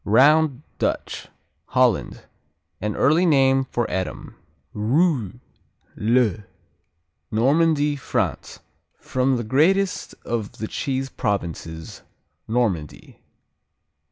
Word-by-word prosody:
Round 140 +5 +4 0.2
Dutch - - -2 0.4
Holland 125 -4 +1 0.6
An 105 0 -2
early 155 +5 +3
name 135 -3 +4
for 120 -2 -2
Edam. 95 +1 -4 0.4
Rouy, 125 - +1 0.6
le 110 -2 +1 0.9
Normandy, 145 +5 +2
France 140 - -3 0.4
From 130 0 0
the 120 - -3
greatest 180 - +1
of 115 -3 -3
the 110 - -5
cheese 135 +1 -3
provinces, 85 -7 -4 0.5
Normandy. 105 - -2
125 Hz, 85 wpm, -23 LUFS, 105-145 Hz, 0.9 s, Round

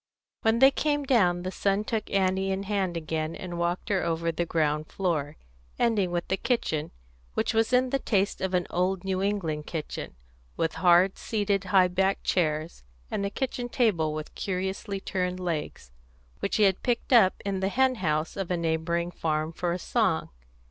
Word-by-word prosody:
When 225 +1 +3
they 265 +3 +7
came 290 0 0
down, 180 -10 +3
the 185 - -3
son 195 +1 0
took 220 0 -3
Annie 190 0 +1
in 190 +1 -2
hand 195 -4 -1
again 160 0 -3
and 175 -2 -6
walked 175 +1 -1
her 195 -3 +2
over 165 0 0
the 170 +1 -2
ground 155 -1 0
floor, 155 -6 -1 0.4
ending 215 -6 +2
with 175 0 -2
the 190 - 0
kitchen, 160 - -1 0.5
which - - 0
was 225 +2 +2
in 255 0 +3
the 275 - +1
taste 200 -6 0
of 190 0 0
an 180 -1 +1
old 180 +1 0
New 190 -1 -1
England 175 -7 -1
kitchen, 155 - -5 0.4
with 165 -1 0
hard 180 +1 +5
seated 205 -3 0
high 185 -1 +5
backed 190 +2 0
chairs, 155 - -1 0.3
and 200 - -1
a - - -3
kitchen 245 +1 -3
table 195 - +2
with 155 0 -6
curiously 190 +1 -3
turned 185 -2 -2
legs, 160 - -4 0.5
which - - -1
he 215 - +4
had 190 -2 +3
picked 245 +1 0
up 205 -6 +6
in 195 -1 -1
the 190 +1 0
hen 260 +4 +3
house 155 -2 0
of 195 -3 -3
a 180 - 0
neighbouring 170 +1 -1
farmer 155 -1 -1
for 175 +1 -2
a 175 - -1
song. 185 -2 0
185 Hz, 185 wpm, -27 LUFS, 170-200 Hz, 0.5 s, they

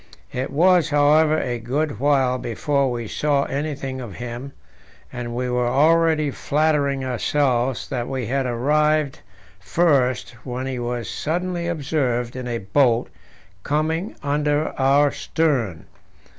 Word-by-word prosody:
It 130 +1 -3
was, 170 +2 +4
however, 150 +2 +4
a 120 -5 -2
good 140 +5 -2
while 135 -2 +2
before 135 +4 0
we 120 -2 -4
saw 145 +4 +1
anything 140 -2 -4
of 110 -7 -8
him, 120 +3 -6 0.6
and 120 -1 -5
we 125 +1 -1
were 125 0 0
already 155 +2 +3
flattering 140 -2 0
ourselves 130 -1 0
that 125 -4 -3
we 130 -3 -3
had 135 +2 -1
arrived 150 +4 +1 0.4
first 130 - +1
when 125 0 -4
he 130 -2 -3
was 120 -1 -3
suddenly 175 +2 -2
observed 135 -7 -1
in 130 -1 -5
a 120 -1 -2
boat 115 +3 +2 0.5
coming 160 +6 -1
under 150 +1 +1
our 140 +2 +3
stern. 130 - -1
140 Hz, 130 wpm, -22 LUFS, 125-150 Hz, 0.6 s, was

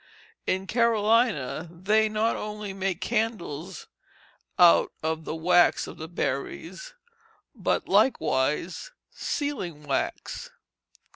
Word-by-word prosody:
In 190 +1 0
Carolina 220 - +2
they 210 +5 +2
not 215 +2 +1
only 210 -1 -5
make 190 -2 -2
candles 190 -7 -2 0.7
out 175 -2 +6
of 160 0 -2
the - - -3
wax 175 +2 +4
of - - -10
the 160 - -6
berries, 170 - -4 0.6
but - - -1
likewise 165 - +1 0.2
sealing 190 - -3
wax." 140 -2 -3
190 Hz, 95 wpm, -26 LUFS, 160-220 Hz, 0.7 s, out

